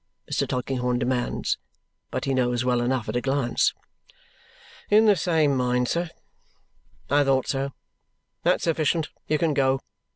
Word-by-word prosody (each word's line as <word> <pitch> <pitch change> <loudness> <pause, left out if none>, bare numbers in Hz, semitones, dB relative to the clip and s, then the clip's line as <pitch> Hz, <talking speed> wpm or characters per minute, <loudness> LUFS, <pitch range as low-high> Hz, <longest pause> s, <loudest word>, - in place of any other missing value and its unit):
Mr. - - 0
Tulkinghorn 125 -1 -1
demands. 125 0 -1 0.5
But - - -3
he 135 - 0
knows 125 -1 +1
well 125 -1 +2
enough 125 -1 -1
at 105 - -3
a 120 - +1
glance. 135 -2 +1 1.2
"In 215 +2 +6
the 210 -2 +6
same 160 -6 +2
mind, 125 -1 +1
sir." 170 0 -1 1.0
"I 145 0 +5
thought 135 -2 +2
so. 135 0 -2 0.7
That's - - +2
sufficient. 160 -1 +1 0.2
You 155 - +2
can 160 0 +1
go. 135 -1 +2
135 Hz, 140 wpm, -25 LUFS, 125-150 Hz, 1.2 s, In